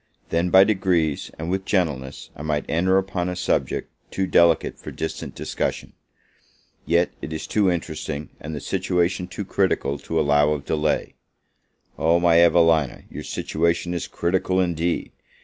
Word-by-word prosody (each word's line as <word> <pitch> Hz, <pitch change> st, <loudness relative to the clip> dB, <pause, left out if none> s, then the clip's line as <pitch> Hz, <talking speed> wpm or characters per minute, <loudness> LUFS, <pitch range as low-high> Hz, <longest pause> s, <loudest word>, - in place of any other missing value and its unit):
then, 85 Hz, +2 st, +1 dB
by 95 Hz, +2 st, +8 dB
degrees, 90 Hz, -7 st, +1 dB
and 80 Hz, +2 st, -4 dB
with 95 Hz, 0 st, -1 dB
gentleness, 75 Hz, -10 st, -2 dB
I -, -, -9 dB
might 75 Hz, -1 st, -2 dB
enter 95 Hz, +4 st, +2 dB
upon 95 Hz, -2 st, -1 dB
a 90 Hz, -, -3 dB
subject -, -, -1 dB, 0.2 s
too 95 Hz, -, -1 dB
delicate 85 Hz, -2 st, +3 dB
for -, -, -8 dB
distant 80 Hz, -, -5 dB
discussion. -, -, -3 dB, 0.9 s
Yet 85 Hz, +1 st, +2 dB
is 80 Hz, +3 st, -5 dB
it -, -, -11 dB
too 105 Hz, -3 st, +3 dB
interesting, 80 Hz, -3 st, -4 dB
and 80 Hz, +1 st, -6 dB
the 75 Hz, -, -5 dB
situation 90 Hz, -1 st, 0 dB
too 100 Hz, +2 st, -6 dB
critical, 80 Hz, -8 st, 0 dB
to 80 Hz, +3 st, -2 dB
allow 75 Hz, 0 st, +3 dB
of 70 Hz, -2 st, -5 dB
delay. 75 Hz, -1 st, 0 dB, 0.9 s
Oh, 85 Hz, +2 st, +3 dB
my 85 Hz, -1 st, +5 dB
Evelina, 80 Hz, -5 st, +3 dB
your -, -, -6 dB
situation 85 Hz, +2 st, -1 dB
is 85 Hz, -, -3 dB
critical 95 Hz, +1 st, 0 dB
indeed! 85 Hz, -1 st, -1 dB
85 Hz, 150 wpm, -23 LUFS, 80-90 Hz, 0.9 s, by